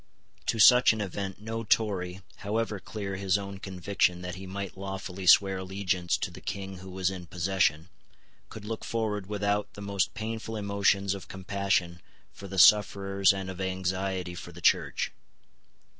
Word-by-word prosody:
To 115 - +1
such 125 +2 +7
an 110 - -5
event 100 -1 -4
no 115 +2 -4
Tory, 95 -4 0
however 105 0 -2
clear 100 -1 -5
his 95 0 +1
own 100 -1 -6
conviction 90 -1 0
that 90 0 -4
he 95 +1 -8
might 100 0 -5
lawfully 95 -1 -6
swear 95 +1 +6
allegiance 95 -2 -1
to - - -3
the - - -11
King 95 0 -5
who 95 +1 -10
was 95 0 -1
in 90 -2 -8
possession, 85 -3 0 0.6
could 110 -2 -9
look 110 0 -5
forward 105 -4 -2
without 105 0 -1
the 105 - -9
most 100 -2 -1
painful 110 +1 -4
emotions 100 -1 +1
of 100 - -8
compassion 95 -2 -1 0.3
for 100 - -10
the 95 0 -7
sufferers 100 0 +5
and 95 -1 -4
of 95 0 -6
anxiety 95 -1 -2
for 85 0 -8
the 90 - -12
Church. - - +2
95 Hz, 160 wpm, -28 LUFS, 95-100 Hz, 0.6 s, such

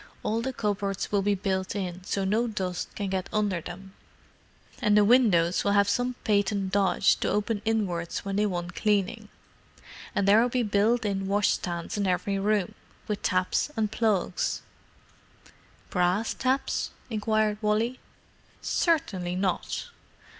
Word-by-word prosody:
All 225 +2 0
the 265 +3 -2
cupboards 200 -4 -2
will 200 -1 +2
be 205 +1 +2
built 190 0 -2
in, 185 -2 -4
so's 195 0 -1
no 225 +5 +1
dust 185 -5 -4
can 200 -2 -3
get 190 -1 -2
under 205 -5 0
them, 190 +3 -9 0.9
and 210 0 +4
the 210 - +6
windows 200 -8 +4
will 200 - +2
have 200 0 +4
some 245 +2 0
patent 200 -2 +1
dodge 195 0 +3
to - - -1
open 210 0 0
inwards 195 -6 -1
when 195 0 -2
they 210 +1 +2
want 175 -2 -4
cleaning. 210 +1 0 0.9
And 200 - +1
there'll 225 +5 +5
be 245 0 0
built 215 +3 +2
in 195 -1 -1
washstands 190 -2 0
in 200 - +1
every 195 +2 0
room, 205 -1 +1 0.3
with 210 -1 -2
taps 185 +8 +1
and 215 -2 0
plugs——" 215 -5 0 1.3
"Brass 180 +5 +1
taps?" 265 +1 0 0.3
queried 215 0 +1
Wally. 220 +4 0 0.6
"Certainly 190 - 0
not." 190 - -2
205 Hz, 140 wpm, -27 LUFS, 190-215 Hz, 1.3 s, the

